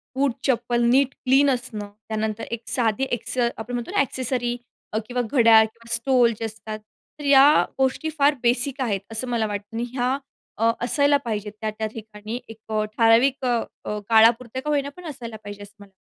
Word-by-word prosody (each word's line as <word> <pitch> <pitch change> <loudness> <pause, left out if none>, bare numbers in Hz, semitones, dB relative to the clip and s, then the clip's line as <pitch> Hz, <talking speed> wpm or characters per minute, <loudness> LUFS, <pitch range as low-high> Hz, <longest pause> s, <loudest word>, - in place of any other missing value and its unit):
बूट 275 0 +2 0.2
चप्पल 240 -2 +1
नीट 270 +2 +3
क्लीन 275 +2 +3
असणं. 240 -5 -3 0.2
त्यानंतर 220 0 -2
एक 235 0 -5
साधी 235 +1 +1
ॲक्से 240 +1 0
आपण 225 +2 -7
म्हणतो 245 +7 -4
ना, 410 - +1
ॲक्सेसरी 250 -2 -1 0.4
अ, - - 0
किंवा 250 0 -1
घड्याळ 225 -2 +5
किंवा 230 +1 -8
स्टोल, 240 0 +3
जे 225 - -2
असतात. 220 0 -7 0.4
तर - - -7
या 280 +1 +6
गोष्टी 265 +4 0
फार 285 +1 +4
बेसिक 250 +3 +1
आहेत, 205 -7 -1
असं 225 +3 -2
मला 235 -2 0
वाटतं. 205 +1 -6
आणि 230 - -1
ह्या 255 +1 0 0.4
अ, 225 +1 +3 0.2
असायला 285 +2 +3
पाहिजेत 210 -2 -3
त्या-त्या 215 0 -3
ठिकाणी 215 +1 -7
एक 225 - -10
अ, 215 0 +1
ठराविक 240 +4 +4
अ, 240 -2 +2 0.3
अ, 210 0 -3
काळापुरता 230 +2 +4
का 300 - -5
होईना 285 -1 0
पण 360 - -11
असायला 235 -5 -8
पाहिजे 205 0 -8
असं 205 0 -14
मला - - -11
वाटतं. 195 - -31
235 Hz, 185 wpm, -23 LUFS, 220-260 Hz, 0.4 s, या